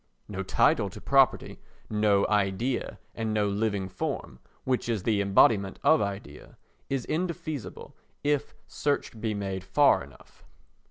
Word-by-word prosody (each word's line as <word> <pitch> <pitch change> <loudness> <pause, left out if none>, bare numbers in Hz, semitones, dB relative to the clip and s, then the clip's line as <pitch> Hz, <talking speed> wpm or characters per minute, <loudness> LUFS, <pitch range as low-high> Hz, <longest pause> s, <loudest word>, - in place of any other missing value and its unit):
No 95 -2 -4
title 95 - +2
to - - -10
property, - - +2 0.3
no 105 -2 +2
idea 105 +5 0 0.2
and 110 -1 -2
no 105 -1 +2
living 100 -1 -1
form 90 -8 -5 0.2
(which 130 -2 -1
is 110 -5 -1
the 105 -2 +1
embodiment 100 0 +3
of 160 - +5
idea) 100 -7 -6 0.3
is 135 -3 -2
indefeasible 165 -5 -4 0.3
if 145 -1 0
search 140 -6 -2
be 110 -2 -1
made 95 -2 -4
far 140 +9 +4
enough. - - -18
105 Hz, 130 wpm, -27 LUFS, 100-130 Hz, 0.3 s, of